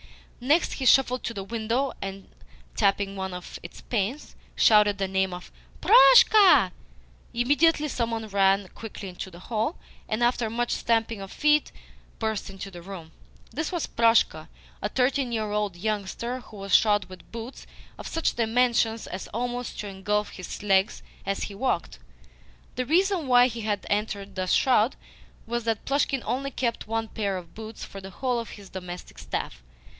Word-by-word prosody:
Next, 300 Hz, +7 st, +3 dB
he 260 Hz, -, -2 dB
shuffled 255 Hz, -1 st, +4 dB
to 230 Hz, -, -3 dB
the 195 Hz, -, -4 dB
window, 230 Hz, +5 st, -1 dB
and, 195 Hz, 0 st, -6 dB, 0.5 s
tapping 200 Hz, -1 st, +1 dB
one 190 Hz, -1 st, -4 dB
of 180 Hz, -, -8 dB
its 170 Hz, -, -11 dB
panes, 235 Hz, +6 st, -3 dB, 0.2 s
shouted 210 Hz, -2 st, +5 dB
the 195 Hz, -1 st, -1 dB
name 190 Hz, 0 st, 0 dB
of 180 Hz, -, -11 dB, 0.3 s
"Proshka." 440 Hz, -4 st, +7 dB, 0.6 s
Immediately 290 Hz, +6 st, +3 dB
some 235 Hz, -3 st, -1 dB
one 225 Hz, -1 st, -3 dB
ran 195 Hz, -1 st, +2 dB
quickly 210 Hz, -3 st, -8 dB
into 180 Hz, +1 st, -7 dB
the 170 Hz, -, -13 dB
hall, 220 Hz, -, -2 dB, 0.3 s
and, 215 Hz, +2 st, 0 dB
after 240 Hz, -2 st, +1 dB
much 240 Hz, +2 st, -1 dB
stamping 225 Hz, -2 st, 0 dB
of 195 Hz, -, -8 dB
feet, 300 Hz, 0 st, +2 dB, 0.5 s
burst 220 Hz, -3 st, -2 dB
into 195 Hz, 0 st, -8 dB
the 175 Hz, -2 st, -10 dB
room. 170 Hz, -3 st, -9 dB, 0.4 s
This 315 Hz, +1 st, -3 dB
was 345 Hz, -3 st, -1 dB
Proshka 225 Hz, -9 st, +2 dB, 0.3 s
a 210 Hz, -, -1 dB
thirteen 255 Hz, +1 st, +1 dB
year 215 Hz, -2 st, -2 dB
old 210 Hz, -3 st, -1 dB
youngster 215 Hz, +5 st, -3 dB
who 220 Hz, -4 st, -13 dB
was 195 Hz, -1 st, -5 dB
shod 205 Hz, -2 st, +5 dB
with 185 Hz, -1 st, -14 dB
boots 230 Hz, +3 st, -8 dB, 0.3 s
of -, -, -6 dB
such 325 Hz, -, -1 dB
dimensions 230 Hz, -1 st, +1 dB
as 185 Hz, -, -6 dB
almost 245 Hz, +2 st, -4 dB
to 210 Hz, -, -6 dB
engulf 210 Hz, +2 st, -1 dB
his 185 Hz, +2 st, -8 dB
legs 195 Hz, +1 st, +2 dB, 0.2 s
as 195 Hz, -, -1 dB
he 205 Hz, -, -5 dB
walked. 205 Hz, -4 st, -2 dB, 0.7 s
The 255 Hz, 0 st, -3 dB
reason 360 Hz, 0 st, +2 dB
why 245 Hz, -1 st, +6 dB
he 235 Hz, -2 st, -3 dB
had 210 Hz, -2 st, -2 dB
entered 205 Hz, -1 st, -2 dB
thus 185 Hz, -1 st, -2 dB
shod 245 Hz, -2 st, +3 dB, 0.5 s
was 235 Hz, 0 st, -3 dB
that 225 Hz, -2 st, -1 dB
Plushkin 275 Hz, -2 st, 0 dB
only 275 Hz, +2 st, -1 dB
kept 240 Hz, -5 st, -2 dB
one 225 Hz, 0 st, -1 dB
pair 200 Hz, -3 st, -2 dB
of 170 Hz, -2 st, -10 dB
boots 220 Hz, 0 st, -8 dB
for 195 Hz, -, -10 dB
the 190 Hz, -, -8 dB
whole 250 Hz, +5 st, -1 dB
of 230 Hz, -, -6 dB
his 200 Hz, -2 st, -12 dB
domestic 180 Hz, -1 st, -8 dB
staff. -, -, -5 dB
220 Hz, 170 wpm, -26 LUFS, 195-245 Hz, 0.7 s, Proshka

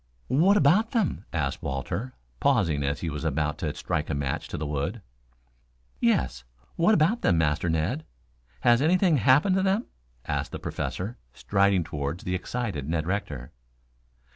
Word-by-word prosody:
"What 175 Hz, -, +4 dB
about 195 Hz, +9 st, +4 dB
them?" 225 Hz, -7 st, 0 dB
asked -, -, -2 dB
Walter, 100 Hz, -, -4 dB, 0.2 s
pausing 75 Hz, -4 st, +2 dB
as 70 Hz, +1 st, -1 dB
he 85 Hz, -, -2 dB
was 75 Hz, +1 st, -5 dB
about 75 Hz, 0 st, -1 dB
to 75 Hz, -, -1 dB
strike 75 Hz, -, -2 dB
a 75 Hz, -, -1 dB
match 70 Hz, -2 st, -2 dB
to -, -, -5 dB
the 75 Hz, -, -3 dB
wood. 75 Hz, +9 st, -3 dB, 1.0 s
"Yes, 65 Hz, -2 st, +1 dB, 0.3 s
what 175 Hz, +3 st, +4 dB
of 195 Hz, +10 st, +2 dB
them, 85 Hz, -, +3 dB
Master 80 Hz, +1 st, +1 dB
Ned? 85 Hz, -, 0 dB, 0.6 s
Has 120 Hz, +1 st, +4 dB
anything 175 Hz, +1 st, +4 dB
happened 140 Hz, -, +4 dB
to -, -, +2 dB
them?" 195 Hz, +4 st, +1 dB, 0.4 s
asked -, -, -2 dB
the -, -, -2 dB
Professor, 100 Hz, +7 st, -4 dB, 0.2 s
striding 100 Hz, -2 st, +2 dB
toward 75 Hz, 0 st, -4 dB
the 90 Hz, -, -3 dB
excited 95 Hz, -, -3 dB
Ned 80 Hz, -1 st, 0 dB
Rector. 75 Hz, -9 st, -3 dB
90 Hz, 155 wpm, -27 LUFS, -, 1.0 s, What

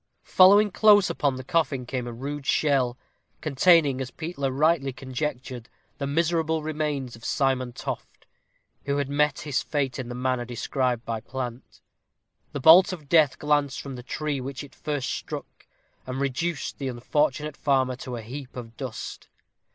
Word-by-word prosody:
Following 205 Hz, +3 st, +6 dB
close 205 Hz, 0 st, +5 dB
upon 140 Hz, -3 st, 0 dB
the 130 Hz, -, -6 dB
coffin 135 Hz, -3 st, 0 dB
came 125 Hz, -1 st, -3 dB
a -, -, -4 dB
rude 140 Hz, +4 st, -6 dB
shell, 130 Hz, -5 st, +2 dB, 0.4 s
containing, 155 Hz, -2 st, +4 dB
as 130 Hz, -, -4 dB
Peter 155 Hz, -3 st, -3 dB
rightly 145 Hz, 0 st, +2 dB
conjectured, 130 Hz, -2 st, -5 dB, 0.3 s
the 140 Hz, -, -2 dB
miserable 160 Hz, +1 st, +1 dB
remains 150 Hz, -5 st, -2 dB
of 115 Hz, -, -16 dB
Simon 130 Hz, -3 st, 0 dB
Toft, 120 Hz, -, -7 dB, 0.6 s
who 140 Hz, 0 st, 0 dB
had 140 Hz, -1 st, -1 dB
met 145 Hz, 0 st, +1 dB
his 145 Hz, -3 st, -1 dB
fate 140 Hz, -3 st, -2 dB
in 125 Hz, -2 st, -5 dB
the 120 Hz, -, -5 dB
manner 130 Hz, 0 st, -1 dB
described 125 Hz, 0 st, -2 dB
by 115 Hz, -1 st, -3 dB
Plant. 125 Hz, 0 st, -7 dB, 0.7 s
The 145 Hz, -, -4 dB
bolt 165 Hz, +8 st, +8 dB
of 155 Hz, -6 st, -8 dB
death 150 Hz, -6 st, +4 dB
glanced 145 Hz, -2 st, +1 dB
from 140 Hz, -2 st, -7 dB
the 125 Hz, -, -7 dB
tree 145 Hz, +2 st, -3 dB
which 135 Hz, +1 st, -6 dB
it 140 Hz, -2 st, -13 dB
first 145 Hz, -1 st, -3 dB
struck, -, -, -7 dB, 0.4 s
and 130 Hz, +1 st, -4 dB
reduced 140 Hz, +3 st, -2 dB
the 135 Hz, -, -3 dB
unfortunate 145 Hz, +4 st, -1 dB
farmer 130 Hz, -3 st, +1 dB
to 125 Hz, -1 st, -6 dB
a 115 Hz, -, -6 dB
heap 130 Hz, +3 st, -8 dB
of 115 Hz, -2 st, -8 dB
dust. 130 Hz, -5 st, -6 dB
140 Hz, 160 wpm, -26 LUFS, 130-150 Hz, 0.7 s, bolt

